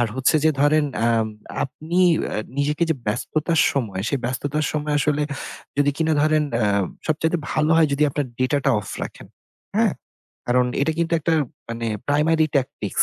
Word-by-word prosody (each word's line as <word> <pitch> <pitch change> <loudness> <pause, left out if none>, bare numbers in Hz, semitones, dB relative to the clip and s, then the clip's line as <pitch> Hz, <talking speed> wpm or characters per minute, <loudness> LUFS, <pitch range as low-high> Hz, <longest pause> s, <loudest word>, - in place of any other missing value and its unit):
আর 120 - +3
হচ্ছে 130 +4 +3
যে 160 - +6
ধরেন, 150 +1 +4 0.2
অ্যাম 115 -1 +2 0.4
আপনি 160 +6 -4 0.3
অ্যা - - -3 0.2
নিজেকে 150 +2 0
যে - - +3
ব্যস্ততার 155 +9 0
সময়, 105 -9 -2
সে - - 0
ব্যস্ততার 145 +4 -1
সময় 150 -1 -1
আসলে 150 0 +1 0.6
যদি 145 0 +4
কিনা 160 0 +1
ধরেন, 155 0 +3
অ্যা 110 -3 +2 0.4
সবচাইতে 160 +2 +1
ভালো 155 0 +1
হয় 160 -2 +5
যদি 140 - +1
আপনার 145 0 -2
data 130 +3 +2
টা 135 - +4
off 100 - -9
রাখেন, - - -7 0.5
হ্যাঁ? - - +3 0.5
কারণ 125 0 +3 0.2
এটা 160 +3 +1
কিন্তু 170 0 0
একটা 165 +1 +1 0.3
মানে 115 0 -4 0.2
primary 155 +2 +3
tactics 130 -1 0
145 Hz, 165 wpm, -22 LUFS, 130-155 Hz, 0.6 s, যে